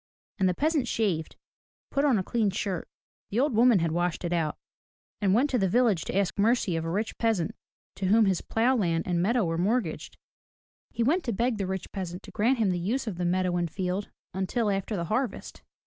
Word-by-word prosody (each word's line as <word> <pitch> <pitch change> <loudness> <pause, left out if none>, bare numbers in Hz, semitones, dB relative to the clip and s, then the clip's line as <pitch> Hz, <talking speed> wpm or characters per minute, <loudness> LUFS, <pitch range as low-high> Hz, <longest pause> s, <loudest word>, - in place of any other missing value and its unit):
And 190 -1 +3
the 180 - -1
peasant 300 - +1
shaved, 190 -10 -1 0.6
put 280 - +1
on 265 -6 +4
a 190 - 0
clean 225 0 +1
shirt, 190 -3 -3 0.2
— - - -76
the 215 - -1
old 280 0 +2
woman 235 0 +5
had 165 -2 0
washed 175 +1 -1
it 175 - -1
out 160 -3 -1 0.3
— - - -58
and 195 -1 +3
went 260 +6 +3
to 250 - +2
the 190 -2 +2
village 225 -6 +2
to - - -2
ask 200 0 0
mercy 215 -4 +2
of 165 - -1
a 165 - -3
rich 210 +6 -2
peasant 220 -8 +1 0.4
to 190 - -1
whom 220 +3 +5
his 190 -3 +1
plough 240 +4 +1
land 170 -7 0
and 175 -1 0
meadow 225 +3 +2
were 165 0 -1
mortgaged. 200 -2 -1 0.7
He 235 - -1
went 325 +9 +2
to 240 - 0
beg 230 +2 0
the 195 - -1
rich 190 -2 -4
peasant 180 -1 -5
to - - -11
grant 235 +5 +2
him 215 -5 +2
the 175 - -1
use 225 +10 -1
of 210 -6 -4
the 175 - -1
meadow 180 0 +1
and 175 -1 -1
field 185 +3 -3 0.2
until 205 +3 0
after 195 +2 -2
the 170 -3 -2
harvest. 250 +7 -3
195 Hz, 225 wpm, -27 LUFS, 180-230 Hz, 0.7 s, woman